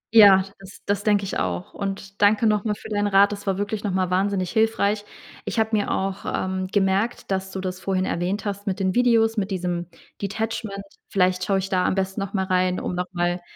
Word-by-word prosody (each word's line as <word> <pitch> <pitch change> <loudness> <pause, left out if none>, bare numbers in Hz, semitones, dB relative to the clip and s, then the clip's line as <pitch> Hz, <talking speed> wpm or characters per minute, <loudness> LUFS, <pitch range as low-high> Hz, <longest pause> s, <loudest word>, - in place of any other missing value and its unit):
Ja, 200 -3 +9 0.2
das 195 -1 -13
das 205 0 0
denke 205 -2 +3
ich 195 - -3
auch. 90 -1 -3
Und 195 0 -5
danke 205 +2 +4
nochmal 210 0 +1
für - - -11
deinen 205 -1 0
Rat. 200 0 +5
Das 200 0 -7
war 190 -1 +1
wirklich 205 +1 -3
nochmal 185 -3 0
wahnsinnig 190 -1 0
hilfreich. 215 -2 +1 0.4
Ich - - -4
habe 220 0 +2
mir 205 - 0
auch, 195 0 -2
ähm, 185 0 -2
gemerkt, 195 +3 0
dass 190 0 -1
du 190 - -5
das 185 -1 -4
vorhin 185 0 -1
erwähnt 185 +5 -2
hast, 205 0 -4
mit 195 0 -1
den 190 -1 +1
Videos, 230 -2 +3
mit 200 -1 0
diesem 175 -2 -2 0.3
Detachment. 205 0 -3 0.3
Vielleicht 185 -1 +2
schaue 195 +1 +1
ich 190 0 -2
da 185 -2 +1
am - - +1
besten 195 +1 -1
nochmal 195 -1 -2
rein, 185 -1 +1
um - - -3
nochmal 175 0 -1
195 Hz, 205 wpm, -23 LUFS, 185-205 Hz, 0.4 s, Ja